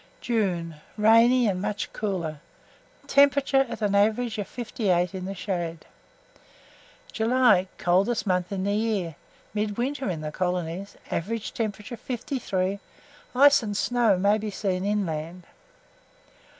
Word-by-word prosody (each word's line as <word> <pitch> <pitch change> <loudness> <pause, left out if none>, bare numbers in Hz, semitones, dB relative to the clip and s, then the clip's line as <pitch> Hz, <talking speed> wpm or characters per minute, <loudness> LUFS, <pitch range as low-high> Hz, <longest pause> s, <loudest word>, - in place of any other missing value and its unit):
JUNE. 180 -9 -1 0.2
Rainy, 230 +3 +5
and 185 -2 -1
much 210 0 -3
cooler; 175 -8 -3 0.7
temperature 280 -1 +4
at - - -5
an 205 -1 +1
average 220 +3 +2
of 205 - -3
58 195 -7 -1
in 185 -1 -5
the 195 +1 -5
shade. 170 -4 -4 1.3
JULY. 230 -4 +3
Coldest 195 +7 +1
month 180 -1 0
in 190 -1 -2
the 200 +1 0
year; 210 -6 -1 0.4
midwinter 235 +6 -2
in 165 -4 -3
the 155 0 -4
colonies; 180 +2 -3
average 220 +5 -3
temperature, 220 +1 -4
53. 200 -7 -2 0.6
Ice 280 +2 +7
and 205 -3 -3
snow 235 -5 +2
may 200 +3 +3
be 215 0 -4
seen 190 -2 -2
inland. 180 -4 -2
205 Hz, 125 wpm, -26 LUFS, 180-230 Hz, 1.3 s, Ice